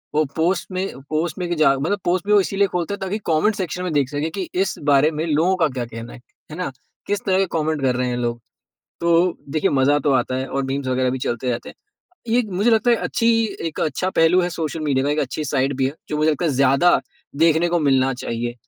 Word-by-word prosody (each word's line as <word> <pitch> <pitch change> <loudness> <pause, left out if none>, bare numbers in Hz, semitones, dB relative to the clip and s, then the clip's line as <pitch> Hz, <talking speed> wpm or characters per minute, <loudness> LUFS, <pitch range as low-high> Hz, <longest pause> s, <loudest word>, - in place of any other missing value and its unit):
वो 155 - +4
पोस्ट 170 +4 0
में 185 -5 -3
पोस्ट 155 +1 -1
में 180 - -2
कि 175 - 0
जा 155 -3 +4
मतलब 165 +9 -1
पोस्ट 175 +1 0
भी 210 - +3
वो 205 - +7
इसीलिए 195 +1 +1
खोलते 180 +1 -2
हैं 200 - -5
ताकि 190 +2 -2
कमेंट 165 +7 +2
सेक्शन 180 -2 -3
में 180 - -2
देख 140 -3 +1
सके 145 +2 -2
कि 185 -3 -3
इस 195 - -1
बारे 145 +1 +4
में 155 +1 -3
लोगों 165 +4 +2
का 170 -4 +2
क्या 130 -3 -4
कहना 115 0 -9
है, - - -11 0.3
है 155 - -7
ना? 180 -6 -3 0.4
किस 205 0 0
तरह 190 -1 +2
के 195 - +3
कमेंट 155 -1 -1
कर 130 -2 +1
रहे 125 0 0
हैं 120 - -2
लोग। 120 -1 -2 0.6
तो 170 0 +2 0.4
देखिए 155 +1 +1
मज़ा 140 +1 +3
तो 145 0 0
आता 130 0 +1
है 130 +1 -2
और 135 0 -2
मीम्स 135 +1 -3
वगैरह 130 0 +1
भी 130 - -3
चलते 125 0 -2
रहते 120 0 -4
हैं। - - -11 0.6
ये 240 - +4
एक 240 -3 0
मुझे 200 +6 +2
लगता 225 +2 +3
है 235 - +5
अच्छी 230 0 0 0.4
एक 160 - -5
अच्छा 160 +5 -1
पहलू 165 +3 +5
है 175 - 0
सोशल 165 -1 -4
मीडिया 140 -3 0
का 145 - +1
एक 150 - -1
अच्छी 145 +3 -3
साइड 140 -1 0
भी 135 -1 +1
है, 135 - -4
जो 150 - -2
मुझे 155 +1 +3
लगता 150 +3 -2
है 165 - +2
ज़्यादा 140 +6 +4 0.4
देखने 165 +2 +3
को 175 0 +1
मिलना 135 -2 +2
चाहिए। 120 -1 -4
155 Hz, 255 wpm, -21 LUFS, 135-180 Hz, 0.6 s, वो